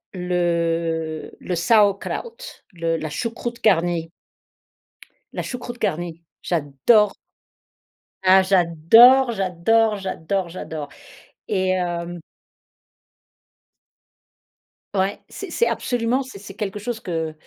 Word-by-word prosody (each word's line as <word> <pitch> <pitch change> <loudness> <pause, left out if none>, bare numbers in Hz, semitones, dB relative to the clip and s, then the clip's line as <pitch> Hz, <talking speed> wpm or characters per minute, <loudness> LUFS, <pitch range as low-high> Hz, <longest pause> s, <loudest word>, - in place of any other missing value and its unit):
le 170 -3 -1
le 180 - -3
Sauerkraut 210 - +1 0.3
le 165 -1 -1
la 155 -1 -5
choucroute 235 +5 -5
garnie 170 -4 +2 1.2
la - - -2
choucroute 245 -1 -7
garnie, 170 0 -2 0.2
j'adore 170 - +2 1.1
ah, 190 +1 +7
j'adore, 195 +8 +6
j'adore, 210 +3 +1
j'adore, 190 -1 -3
j'adore, 160 -4 -6 0.6
et 185 -1 +1
hem 175 -1 -2 2.8
Ouais, 195 +1 0
c'est - - -8
c'est 470 - +1
absolument, 245 +1 0
c'est 260 -6 -9
c'est 195 0 -11
quelque 205 0 -4
chose 225 +2 -4
que 165 -5 -3
185 Hz, 95 wpm, -22 LUFS, 165-220 Hz, 2.8 s, ah